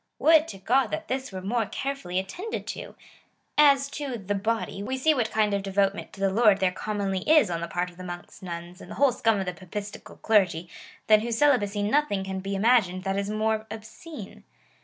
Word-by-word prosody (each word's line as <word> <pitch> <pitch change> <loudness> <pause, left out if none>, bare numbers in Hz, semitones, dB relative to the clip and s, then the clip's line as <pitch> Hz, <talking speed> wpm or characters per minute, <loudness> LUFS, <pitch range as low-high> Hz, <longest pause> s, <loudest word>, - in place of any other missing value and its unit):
Would 320 0 +5
to 195 - -8
God 245 +7 +2
that 315 +9 -5
this 260 -1 -3
were 185 -1 -6
more 225 +2 0
carefully 275 -10 -4
attended 355 - -4
to! - - -7 0.6
As 280 -2 +5
to 275 -4 -4
the 205 -1 -3
body, 215 0 -2
we 260 +6 -3
see 310 +4 +3
wdiat 240 -6 0
kind 215 -2 +1
of 200 - 0
devotement 195 0 0
to - - -12
the 195 -1 +1
Lord 210 -1 +4
there 185 -1 +2
commonly 195 0 -2
is 310 - +5
on 170 -1 -2
the 170 - -3
part 175 +1 -2
of 175 - -20
monks, 175 -1 -8
nuns, 175 0 -7
and - - -12
the - - -7
whole 280 -2 +4
scum 225 -3 +1
of 190 - -2
the 180 - -3
Papistical 200 +4 -8
clergy, 180 -6 +2 0.4
than 215 -1 +6
whose 230 +1 -2
celibacy 210 -8 +2
nothing 210 -3 +1
can 190 0 -4
be 195 +1 -4
imagined 195 -4 +3
that 195 0 -1
is 200 0 -3
more 220 +1 -1
obscene. 220 - -10
205 Hz, 205 wpm, -26 LUFS, 190-250 Hz, 0.6 s, than